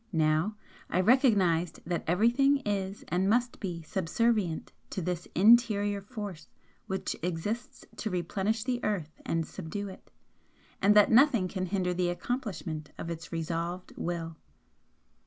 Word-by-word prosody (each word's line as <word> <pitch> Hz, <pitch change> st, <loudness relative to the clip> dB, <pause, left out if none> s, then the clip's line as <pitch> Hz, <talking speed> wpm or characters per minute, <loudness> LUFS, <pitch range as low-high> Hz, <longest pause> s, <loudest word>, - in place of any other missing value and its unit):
Now, 160 Hz, +5 st, +2 dB, 0.3 s
I 180 Hz, -, +1 dB
recognised 190 Hz, -, +3 dB
that 170 Hz, 0 st, -2 dB
everything 245 Hz, -, +3 dB
is 200 Hz, -1 st, -2 dB
and 185 Hz, +3 st, +1 dB
must 240 Hz, +2 st, +1 dB
be 175 Hz, -5 st, -4 dB
subservient 190 Hz, +1 st, 0 dB, 0.2 s
to -, -, -4 dB
this 180 Hz, 0 st, -3 dB
interior 205 Hz, -1 st, +5 dB
force 205 Hz, -6 st, -7 dB, 0.4 s
which 190 Hz, 0 st, -2 dB
exists 195 Hz, +9 st, -3 dB
to 220 Hz, -, -2 dB
'replenish 195 Hz, +4 st, -1 dB
the 250 Hz, -1 st, -2 dB
earth 175 Hz, -7 st, -2 dB
and 165 Hz, -1 st, 0 dB
subdue 195 Hz, +4 st, -5 dB
it' 190 Hz, -, -13 dB, 0.7 s
and 205 Hz, +2 st, +5 dB
that 210 Hz, -1 st, +6 dB
nothing 235 Hz, -5 st, +5 dB
can 185 Hz, 0 st, -3 dB
hinder 180 Hz, -1 st, 0 dB
the 175 Hz, 0 st, 0 dB
accomplishment 175 Hz, -, -4 dB
of 170 Hz, -, -5 dB
its 160 Hz, -1 st, -7 dB
resolved 170 Hz, +2 st, -3 dB
Will. 165 Hz, -2 st, -4 dB
190 Hz, 135 wpm, -30 LUFS, 170-215 Hz, 0.7 s, that